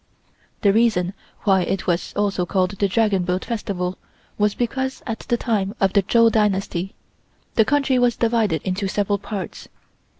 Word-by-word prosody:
The 200 -1 +5
reason 215 -5 +2 0.3
why 190 -2 +3
it 195 +2 -2
was 175 -1 -1
also 200 -3 0
called 185 +1 0
the 200 0 0
Dragon 200 -1 +2
Boat 180 +1 -1
Festival 190 -5 -3 0.4
was 210 -1 +1
because 265 +2 -2
at 225 -2 -3
the 240 - +3
time 210 -4 -1
of 195 -1 +2
the 200 - +5
Chou 230 +4 +4
Dynasty 195 -3 0 0.6
the 220 - +4
country 275 -1 +2
was 245 -1 +3
divided 225 -9 +1
into 190 +1 -1
several 200 +1 0
parts. 200 -2 -6
205 Hz, 160 wpm, -22 LUFS, 190-225 Hz, 0.6 s, The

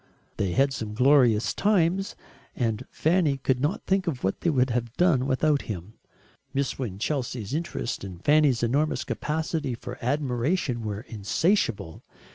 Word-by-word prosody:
They 95 -3 0
had 135 +1 +3
some 110 -4 -5
glorious 125 -3 +4
times, 195 -1 +1 0.4
and 115 -3 -2
Fanny 160 -4 +1
could 130 -1 0
not 145 +7 -1
think 190 -1 +1
what 125 - -2
they 170 - +2
would 130 -4 +2
have 120 0 -3
done 155 -8 +3
without 145 +2 +2
him. 100 0 -5 0.6
Miss 140 -1 -1
Winchelsea's 120 0 -3
interest 155 -9 -3
and 95 -2 -9
Fanny's 145 -5 +4
enormous 145 +6 +1
capacity 155 -3 -2
for 120 +1 -8
admiration 130 0 0
were 105 -1 -4
insatiable. 110 - -1
130 Hz, 135 wpm, -26 LUFS, 115-155 Hz, 0.6 s, glorious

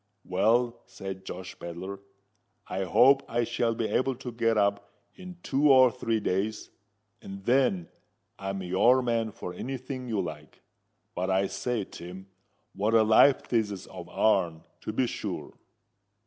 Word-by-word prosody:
"Well," 115 +5 +1
said 95 -1 -8
Josh 95 0 -8
Pedler, 90 +3 -6 0.7
"I 95 +1 -2
hope 135 +9 +5
I 120 +1 +1
shall 115 0 0
be 115 -1 -1
able 130 0 0
to 125 0 -7
get 115 -1 +1
up 100 0 +1 0.2
in 185 -2 -11
two 140 +2 +3
or 130 -2 +7
three 115 -3 -1
days; 100 +2 -2 0.5
and 95 0 -9
then 120 -9 +2 0.5
I'm 95 0 -4
your 120 +9 +4
man 115 -2 0
for 90 - -7
any 130 +9 -4
thing 130 0 -7
you 110 -4 -1
like. 75 -4 -7 0.5
But, 90 +2 -2
I 95 +1 +2
say, 105 +3 -2
Tim, 90 +1 -10 0.5
what 105 +3 +1
a 110 - +6
life 110 +5 +5
this 110 -3 +1
is 100 -2 -7
of 90 -2 -10
our'n, 85 -7 +1 0.2
to - - -5
be 125 +4 +1
sure!" - - -5
110 Hz, 155 wpm, -28 LUFS, 95-120 Hz, 0.7 s, or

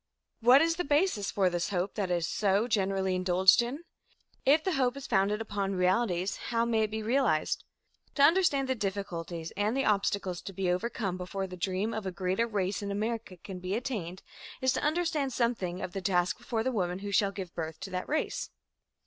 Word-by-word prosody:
What 250 +5 +7
is 330 0 +1
the 355 - 0
basis 290 - +1
for 195 -2 +2
this 175 -1 -1
hope 185 0 -1
that 200 -4 -2
is 170 -2 0
so 205 +2 +1
generally 195 -3 +1
indulged 185 +2 +5
in? 260 +7 -4 0.6
If 305 +3 +5
the 375 - 0
hope 260 -4 +1
is 275 - -7
founded 205 +1 +1
upon 200 -3 -2
realities, 185 0 +1
how 230 0 +1
may 225 -2 +1
it - - -6
be 220 0 -4
realized? 235 - +1 0.5
To 280 - +4
understand 310 -5 +4
the 260 - +2
difficulties 180 -6 -4
and 210 +6 0
the 270 - +1
obstacles 200 -3 0
to 195 - -8
be 185 -1 0
overcome 195 -1 -2
before 190 +2 -4
the 185 -1 -8
dream 190 +5 -1
of 215 -3 -3
a - - -2
greater 185 +5 0
race 200 -3 -1
in 200 - -4
America 215 -1 -3
can 185 +1 -8
be 185 +2 -2
attained, 200 -7 -4 0.4
is 260 0 +2
to - - -1
understand 305 -4 0
something 220 -8 -1
of - - -4
the 195 - -4
task 180 -1 +1
before 225 -2 -2
the 260 - 0
women 180 -6 -1
who 200 - -3
shall 200 0 +3
give 190 -3 -7
birth 160 -1 -5
to 195 - -6
that 185 0 -4
race. 400 +11 -1
200 Hz, 200 wpm, -30 LUFS, 185-240 Hz, 0.6 s, What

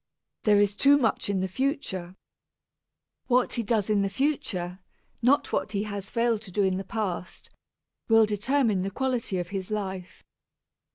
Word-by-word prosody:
There 210 -2 +5
is 205 0 +2
too 280 +5 +5
much 230 -6 0
in 195 -2 0
the 190 - 0
future. 190 - -2 1.1
What 250 0 +2
he 235 - +1
does 215 -2 0
in 210 -2 +2
the 195 - 0
future, 195 -8 -2 0.4
not 260 +5 +2
what 215 - -1
he 200 0 0
has 200 -2 -5
failed 230 -2 +1
to 205 -4 -8
do 205 +2 +1
in 190 -1 +1
the 195 - -4
past, 190 -3 -4 0.6
will 225 0 +6
determine 215 0 +1
the 195 - -2
quality 245 -3 -1
of 175 -1 -3
his 195 -2 -4
life. 190 -4 -5
205 Hz, 165 wpm, -27 LUFS, 190-235 Hz, 1.1 s, will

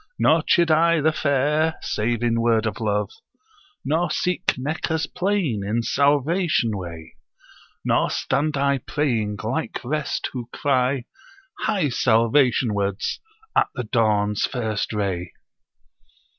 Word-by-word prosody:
Nor - - +4
chid 170 -2 +3
I 165 +1 +4
the 155 +2 +3
fair, 150 +2 +1
save 115 +2 -1
in 115 -1 +1
word 115 -1 +2
of 110 -3 -3
love. 105 -2 -1 0.7
Nor 160 +5 +1
seek 180 +1 0
Meccah's 160 +4 -2
plain 180 - -1
in 110 +4 -1
salvation 145 - +2
way: 85 -4 -8 0.7
Nor - - +2
stand 150 0 -1
I 140 0 +1
praying, 115 -7 -1
like 135 +9 -2
rest, 150 +3 -2
who 120 -2 -6
cry, 130 -2 +1 0.6
"Hie 195 -9 0
salvation 120 0 +3
wards!" 100 -1 -2 0.4
at - - +4
the 125 - -3
dawn's 105 -2 +1
first 110 -5 -2
ray....' 95 -5 -2
125 Hz, 120 wpm, -23 LUFS, 110-155 Hz, 0.7 s, Nor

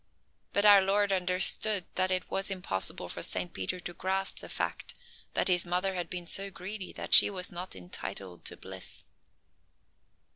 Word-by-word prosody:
But 200 +1 +2
our 205 -1 +9
Lord 200 +1 +1
understood 185 +2 +2
that 185 0 +1
it 185 -1 -2
was 195 +1 -1
impossible 180 - -2
for - - -6
Saint 90 -1 -1
Peter 95 - -3
to 175 - -6
grasp 190 +2 -1
the - - -9
fact - - -3 0.4
that - - +2
his 180 -2 +4
mother 180 +2 -1
had 175 -2 -3
been 180 -1 -5
so 195 +3 0
greedy 195 +1 -7
that - - -5
she - - +11
was 185 -2 -3
not 180 +2 -6
entitled 90 0 -5
to - - -1
bliss. 95 0 -8
185 Hz, 170 wpm, -30 LUFS, 175-195 Hz, 0.4 s, she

